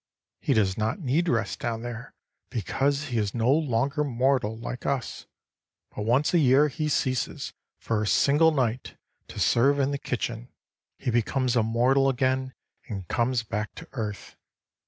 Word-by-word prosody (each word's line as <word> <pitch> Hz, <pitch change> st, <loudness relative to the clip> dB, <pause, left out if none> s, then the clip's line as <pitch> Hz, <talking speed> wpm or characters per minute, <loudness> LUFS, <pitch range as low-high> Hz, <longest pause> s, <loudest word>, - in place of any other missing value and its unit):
"He 135 Hz, -, +1 dB
does 100 Hz, -2 st, +1 dB
not 110 Hz, -, -1 dB
need 165 Hz, +3 st, +1 dB
rest 110 Hz, -6 st, -1 dB
down 115 Hz, -1 st, -3 dB
there, 120 Hz, +1 st, -7 dB, 0.3 s
because 140 Hz, +6 st, -1 dB
he 120 Hz, -2 st, 0 dB
is 105 Hz, 0 st, -2 dB
no 120 Hz, +2 st, +2 dB
longer 140 Hz, 0 st, +1 dB
mortal 125 Hz, -4 st, +1 dB
like 125 Hz, +2 st, -6 dB
us. 135 Hz, -3 st, -3 dB, 0.7 s
But 105 Hz, -, -3 dB
once 130 Hz, +9 st, +2 dB
a 175 Hz, -, +5 dB
year 140 Hz, +1 st, +5 dB
he 150 Hz, +2 st, -2 dB
ceases, 130 Hz, -4 st, -1 dB, 0.2 s
for 110 Hz, -2 st, -1 dB
a 110 Hz, -, -1 dB
single 150 Hz, +8 st, +4 dB
night, 130 Hz, -5 st, -1 dB, 0.3 s
to -, -, -8 dB
serve 135 Hz, +4 st, +3 dB
in 140 Hz, 0 st, +1 dB
the 140 Hz, -, -2 dB
kitchen. 120 Hz, -2 st, -4 dB, 0.5 s
He 125 Hz, -, -2 dB
becomes 125 Hz, +2 st, +1 dB
a 120 Hz, -, +4 dB
mortal 125 Hz, +5 st, +3 dB
again 130 Hz, 0 st, 0 dB, 0.3 s
and 95 Hz, -5 st, -6 dB
comes 120 Hz, 0 st, +1 dB
back 105 Hz, -1 st, -4 dB
to -, -, -10 dB
earth. 105 Hz, -5 st, -5 dB
125 Hz, 160 wpm, -26 LUFS, 115-140 Hz, 0.7 s, a